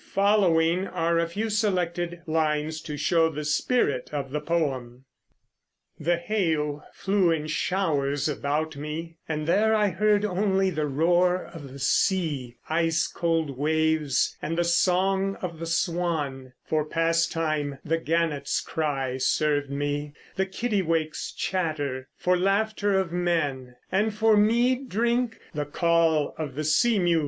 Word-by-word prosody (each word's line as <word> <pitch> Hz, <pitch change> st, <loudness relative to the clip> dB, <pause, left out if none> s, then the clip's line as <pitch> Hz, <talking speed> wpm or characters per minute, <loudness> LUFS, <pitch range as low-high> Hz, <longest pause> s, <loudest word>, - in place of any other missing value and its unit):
Following 190 Hz, -3 st, +3 dB
are 170 Hz, -1 st, 0 dB
a 170 Hz, -, +1 dB
few 215 Hz, +6 st, -3 dB
selected 175 Hz, -5 st, -1 dB
lines 155 Hz, -1 st, 0 dB
to 150 Hz, -2 st, -6 dB
show 165 Hz, +2 st, +3 dB
the 150 Hz, -1 st, -5 dB
spirit 150 Hz, -, +1 dB
of 140 Hz, -3 st, -4 dB
the 150 Hz, +1 st, -2 dB
poem: 135 Hz, -6 st, -2 dB, 0.9 s
The 170 Hz, +3 st, +1 dB
hail 160 Hz, -6 st, -1 dB
flew 195 Hz, -2 st, +1 dB
in 160 Hz, -2 st, 0 dB
showers 150 Hz, -4 st, 0 dB
about 150 Hz, +2 st, -2 dB
me; 160 Hz, +3 st, -6 dB
and 155 Hz, -1 st, -2 dB
there 215 Hz, +6 st, +3 dB
I 210 Hz, -1 st, +3 dB
heard 210 Hz, +3 st, +2 dB
only 195 Hz, -1 st, +1 dB
The 155 Hz, -3 st, -1 dB
roar 175 Hz, +5 st, +2 dB
of 145 Hz, -6 st, -10 dB
the 135 Hz, -, -9 dB
sea, 140 Hz, -4 st, 0 dB
ice 165 Hz, +1 st, +1 dB
cold 165 Hz, -5 st, -1 dB
waves, 155 Hz, -2 st, +1 dB
and 165 Hz, +2 st, -3 dB
the 175 Hz, -, +3 dB
song 190 Hz, +3 st, +2 dB
of 170 Hz, -3 st, -6 dB
the 165 Hz, -, -4 dB
swan; 160 Hz, -7 st, -1 dB
For 155 Hz, -1 st, 0 dB
pastime 165 Hz, -2 st, 0 dB
the 165 Hz, +2 st, 0 dB
gannets' 160 Hz, -4 st, 0 dB
cry 135 Hz, -5 st, -2 dB
served 145 Hz, +1 st, +1 dB
me; 145 Hz, +1 st, -3 dB, 0.2 s
the 190 Hz, 0 st, 0 dB
kittiwakes' 185 Hz, -7 st, -1 dB
chatter 145 Hz, -8 st, -2 dB
For 180 Hz, 0 st, +2 dB
laughter 200 Hz, +1 st, +1 dB
of 185 Hz, -3 st, -2 dB
men; 150 Hz, -8 st, -1 dB, 0.2 s
and 210 Hz, +4 st, +2 dB
for 220 Hz, +1 st, +3 dB
mead 240 Hz, +5 st, +2 dB
drink 235 Hz, +2 st, 0 dB, 0.2 s
the 150 Hz, -1 st, -2 dB
call 165 Hz, 0 st, +2 dB
of 145 Hz, -5 st, -4 dB
the 155 Hz, -, -2 dB
sea 220 Hz, +10 st, +3 dB
mews. 175 Hz, -3 st, +3 dB
165 Hz, 140 wpm, -26 LUFS, 150-190 Hz, 0.9 s, Following